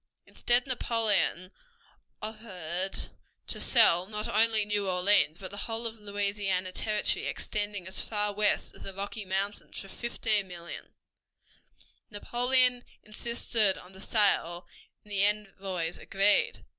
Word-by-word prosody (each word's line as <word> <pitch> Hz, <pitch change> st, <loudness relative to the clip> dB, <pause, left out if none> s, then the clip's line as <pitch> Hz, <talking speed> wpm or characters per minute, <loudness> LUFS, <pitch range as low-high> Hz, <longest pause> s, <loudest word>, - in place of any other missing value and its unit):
Instead 245 Hz, +1 st, +2 dB
Napoleon 225 Hz, -7 st, 0 dB, 0.7 s
offered 190 Hz, -5 st, -3 dB, 0.3 s
to -, -, 0 dB
sell 185 Hz, -7 st, +5 dB
not 210 Hz, 0 st, -4 dB
only 220 Hz, 0 st, +3 dB
New 205 Hz, -1 st, 0 dB
Orleans, 180 Hz, -4 st, +3 dB
but 185 Hz, 0 st, -7 dB
the 200 Hz, -, -7 dB
whole 225 Hz, +1 st, -4 dB
of 225 Hz, -1 st, -5 dB
Louisiana 200 Hz, -2 st, -1 dB
Territory 210 Hz, +2 st, 0 dB
extending 205 Hz, -3 st, -3 dB
as 185 Hz, -, -2 dB
far 210 Hz, -1 st, 0 dB
west 210 Hz, 0 st, +1 dB
as -, -, -15 dB
the 195 Hz, -, -8 dB
Rocky 200 Hz, +2 st, -4 dB
Mountains 195 Hz, +2 st, -3 dB
for 195 Hz, -, -9 dB
$15,000,000. 195 Hz, -6 st, -3 dB, 1.2 s
Napoleon 245 Hz, +3 st, +1 dB, 0.2 s
insisted 215 Hz, -2 st, +1 dB
on 180 Hz, +1 st, -13 dB
the 190 Hz, -, -12 dB
sale, 185 Hz, -5 st, +2 dB, 0.4 s
and 210 Hz, -, -17 dB
the 200 Hz, -1 st, +2 dB
envoys 195 Hz, -4 st, -1 dB
agreed. 205 Hz, -, +2 dB
205 Hz, 120 wpm, -29 LUFS, 190-220 Hz, 1.2 s, sell